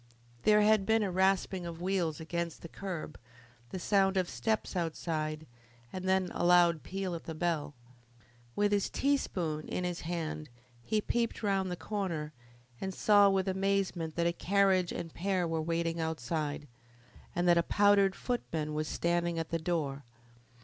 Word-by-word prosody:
There 210 0 +6
had 215 -1 +4
been 220 0 +3
a 195 - -1
rasping 190 0 +1
of 170 -1 -6
wheels 175 -4 -1
against 170 0 -4
the - - -6
curb, 175 -3 -6 0.5
the - - -5
sound 195 +1 +2
of 185 -2 +1
steps 220 -3 -1
outside, 155 -2 -2 0.5
and 185 0 -3
then 190 -1 +2
a - - -2
loud 175 -2 +5
peal 190 -1 -4
at 165 - -6
the 160 - -5
bell. 155 -3 -1 0.8
With 205 0 +2
his 200 -1 +1
teaspoon 180 - -1
in 180 - -2
his 175 -1 -3
hand 160 -3 -4 0.3
he 215 - 0
peeped 235 +1 -1
round 195 -2 +1
the 180 - -2
corner 170 -7 -3 0.5
and 190 -1 -3
saw 205 -1 +6
with 195 0 +1
amazement 190 -4 0
that 170 - +1
a 170 - +2
carriage 190 -1 +2
and 165 -2 -5
pair 185 -1 0
were 165 -1 -1
waiting 165 +1 -1
outside, 155 -1 -2 0.7
and 175 +1 +1
that 170 -1 +6
a - - +5
powdered 200 +1 +4
footman 160 -11 -3
was 155 0 -2
standing 170 +1 0
at 165 -1 -3
the 165 - -1
door. 155 -5 -2
175 Hz, 165 wpm, -31 LUFS, 165-195 Hz, 0.8 s, There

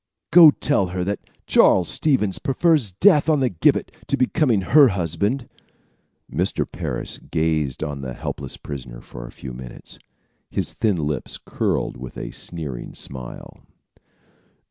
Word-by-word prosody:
"Go 165 -1 +10
tell 145 -9 +1
her 90 0 -3
that 100 +2 -2 0.3
Charles 90 -2 +4
Stevens 130 -11 +1
prefers 140 - +2
death 155 - +4
on 155 -2 +3
the 130 -2 +2
gibbet 85 - +1 0.2
to - - 0
becoming 130 - +2
her 140 +9 +6
husband." 100 - -1 0.9
Mr. - - 0
Parris - - -5
gazed 80 -3 -1
on 75 -3 -4
the 65 -2 -6
helpless - - -6
prisoner 65 -4 -8
for - - -10
several 65 -2 -9
minutes, 65 -1 -10 0.5
his - - -2
thin 110 -4 +1
lips 75 0 -3
curled - - -2
with 65 0 -9
a - - -5
sneering 75 -8 -6
smile. 65 -3 -8
90 Hz, 135 wpm, -22 LUFS, -, 0.9 s, Go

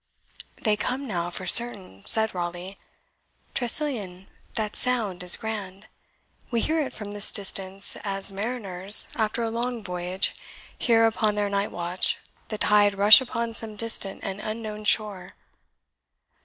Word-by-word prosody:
"They 215 -2 +1
come 255 +6 -3
now, 175 -7 -3
for 185 +1 -6
certain," 185 - +5
said 220 0 +3
Raleigh. 175 +2 -6 0.7
"Tressilian, 235 -8 -1 0.3
that 215 -2 -3
sound 220 -8 -1
is 180 -1 +4
grand. 205 -3 -6 0.6
We 235 - 0
hear 320 +5 +1
it 280 - -4
from 210 -1 -8
this 205 0 +2
distance 195 -1 -1
as 195 -1 -1
mariners, 200 -3 +2
after 220 +1 -1
a 225 - -2
long 235 0 -4
voyage, 180 0 -2 0.4
hear, 225 -2 +3
upon 220 -2 0
their 205 -1 -1
night 200 +1 -1
watch, 175 +1 -2 0.3
the 215 - -5
tide 205 -1 +3
rush 205 +3 +8
upon 235 -2 -4
some 225 -1 -2
distant 210 -3 0
and 195 0 -5
unknown 215 0 -6
shore." 195 -3 -1
210 Hz, 140 wpm, -25 LUFS, 190-225 Hz, 0.7 s, rush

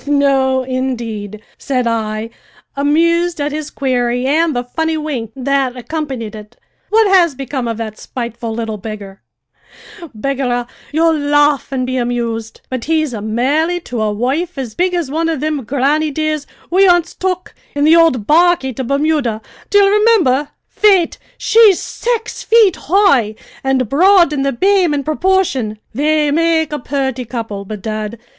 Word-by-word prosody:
"No, 270 -2 +2
indeed," 235 -5 -4 0.2
said 255 -3 -1
I, 220 -1 -2 0.4
amused 335 +4 +1
at 290 +1 -1
his 305 0 -4
query 245 -2 -1
and 310 +2 +2
the 245 - -1
funny 320 +6 -2
wink 275 -8 -4
that 270 -1 0
accompanied 255 -4 -5
it. 210 -1 -12 0.3
"What 440 +1 +4
has 350 -6 +4
become 265 -2 -4
of 230 -1 -3
that 220 -2 -6
spiteful 235 -2 -5
little 220 -1 -4
beggar?" 200 -2 -8 1.0
"Begorrah, 250 -1 -1 0.3
ye'll 325 +1 +2
laugh 290 -1 +2
an' 255 -2 -1
be 255 0 -2
amused, 235 -2 -3
but 255 -3 -5
he's 310 -4 0
marri'd 270 +11 -1
to 240 -3 -4
a 215 -1 0
wife 275 +11 -2
as 250 -5 -5
big 360 +4 0
as 330 -6 -2
one 325 +2 0
of 320 -4 -2
thim 305 -3 -2
grannydeers 300 +2 0 0.2
we 385 +2 +5
onst 350 -1 +2
took 365 -1 -2 0.2
in 285 - 0
the 310 +2 +6
ould 325 -10 +3
barquey 330 -3 +3
to 260 - -2
Bermuda, 275 -4 0 0.3
d'ye 410 - +5
rimimber? 395 - +3 0.2
Faith, 390 -5 +2 0.2
she's 440 -5 +5
saix 465 -2 -3
feet 445 -6 +4
hoigh, 295 - +3 0.3
an' 270 0 +1
broad 340 - +4
in 280 - -1
the 275 0 +1
b'ame 370 +2 +2
in 280 - -2
proporshi'n. 310 - 0 0.2
They 300 +3 +1
make 320 -1 +1
a 295 - -2
purty 265 -1 -2
couple, 225 -4 -5
bedad! 215 +2 -5
275 Hz, 150 wpm, -16 LUFS, 240-325 Hz, 1.0 s, the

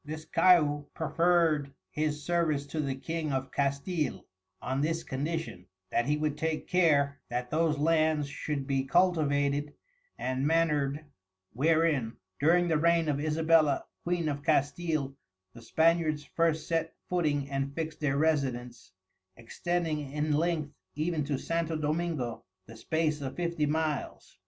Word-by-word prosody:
This 155 +1 -7
Caiu 150 -5 +4
proferred 160 -3 +2 0.2
his 150 -1 -2
Service 160 -4 0
to 155 +2 -5
the 135 -3 -1
King 160 +2 -3
of 135 0 -2
Castile, 140 +2 -1 0.3
on 130 +2 -2
this 165 +2 -1
Condition, 140 - -4 0.2
that 120 - +1
he 150 +1 +2
would 150 -1 -2
take 160 0 -2
care, 145 -6 +3
that 125 +1 -3
those 160 -1 +2
Lands 155 -1 +2
should 140 0 -4
be 135 -1 0
cultivated 145 -3 +1 0.4
and 130 +2 -1
manur'd, 150 -3 +1 0.5
wherein, 150 -4 +2 0.3
during 175 +4 +4
the 160 -3 +2
reign 170 0 +3
of 140 -1 0
Isabella, 155 -1 +2 0.2
Queen 175 -2 -1
of 145 -1 -2
Castile, 145 0 0 0.4
the 115 - -12
Spaniards 160 0 +2
first 160 +1 0
set 165 -1 -1
footing 150 -6 0
and 135 0 -2
fixed 160 -1 -4
their 140 -2 0
Residence, 125 -9 -1 0.4
extending 155 +4 -2
in 150 +1 0
length 155 -1 0 0.2
even 155 +1 -1
to 140 -1 -1
Santo 165 +2 -2
Domingo, 155 -5 -2 0.2
the 115 - -12
space 155 +4 -1
of 135 -1 -5
Fifty 170 -3 -1
Miles. 155 -2 -3
150 Hz, 135 wpm, -29 LUFS, 140-165 Hz, 0.5 s, Caiu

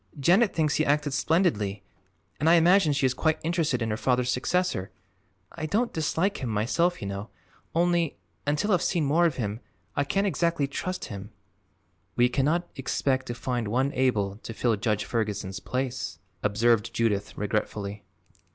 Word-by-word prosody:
Janet 190 - +4
thinks 155 -3 +1
he 155 - +3
acted 145 -1 +1
splendidly 110 - +1 0.6
and 155 - +3
I 170 - +7
imagine 175 0 +5
she 140 -1 +1
is 130 - +2
quite 160 +4 +1
interested 160 -7 0
in 115 - -1
her 110 - -1
father's 125 0 +1
successor. 150 - 0 0.6
I 155 - -5
don't 235 +7 0
dislike 165 +5 0
him, 125 - -4
myself, 130 +10 +1
you - - -3
know; 100 +3 -5 0.5
only, 170 -2 +2 0.3
until 150 +9 +1
I've 180 -3 +3
seen 170 -5 +1
more 165 +5 +4
of 160 - -3
him, 105 -3 -3 0.4
I 140 - +2
can't 195 +8 0
exactly 170 -6 +1
trust 185 +6 -4
him." 100 +1 -7 0.9
"We 120 0 +4
cannot 155 +7 +1
expect 135 0 -1
to 120 - -4
find 120 -2 -2
one 130 +6 +1
able 105 -7 +1
to 115 +1 -8
fill 115 -2 +2
Judge 105 0 -1
Ferguson's 105 -4 -2
place," 125 -8 -3 0.2
observed 115 +2 +2
Judith 105 -3 0
regretfully. 105 0 -2
130 Hz, 160 wpm, -27 LUFS, 110-165 Hz, 0.9 s, I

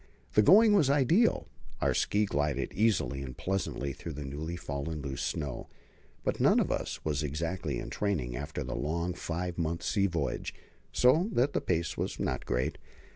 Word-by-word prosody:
The 105 - +6
going 210 - +7
was 160 -10 +4
ideal; 150 - +3 0.3
our - - +2
ski 105 +1 +2
glided 70 -6 -1
easily 105 -10 +1
and 65 -2 -7
pleasantly 85 -7 -2
through 80 +3 -7
the 75 0 -6
newly 75 +5 -4
fallen 75 -1 -4
loose 70 -2 -4
snow. 70 -4 -3 0.6
But - - -1
none - - +5
of - - +1
us - - -3
was 75 -2 0
exactly 80 +5 -2
in - - -6
training 80 -13 -1
after 75 +3 -4
the 65 +1 -4
long 85 +4 -1
five 85 +1 -4
months' 85 +1 -2
sea 100 +1 +2
voyage, 80 -7 -2 0.4
so 155 - +4
that 130 +4 +2
the - - +1
pace 85 -2 -1
was - - -3
not 65 - -2
great. 60 +1 -1
85 Hz, 175 wpm, -30 LUFS, 70-100 Hz, 0.6 s, going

